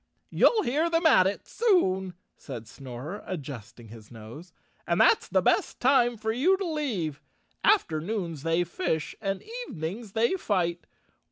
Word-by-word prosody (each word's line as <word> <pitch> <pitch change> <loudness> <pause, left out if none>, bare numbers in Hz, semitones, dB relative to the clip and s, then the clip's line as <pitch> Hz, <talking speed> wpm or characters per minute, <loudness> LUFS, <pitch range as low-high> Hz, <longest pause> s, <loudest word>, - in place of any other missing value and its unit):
"You'll 440 -3 +4
hear 305 +7 +1
them 335 0 +1
at 185 -12 +6
it 200 - -4
soon," 190 - +1 0.2
said 115 -6 -9
Snorer, 135 - -8
adjusting 130 - -7
his 110 -1 -13
nose, 120 +10 -11 0.4
"and - - +1
that's - - +4
the - - +1
best - - +1
time 245 -2 +3
for 220 +1 -2
you 315 +12 +3
to 390 - -3
leave. 230 - -2 0.4
Afternoons 175 - +1
they 165 +3 +1
fish 160 -3 -3
and 195 -2 -2 0.2
evenings 195 +4 -6
they 230 +6 +2
fight. 175 - -1
185 Hz, 145 wpm, -27 LUFS, 155-245 Hz, 0.4 s, at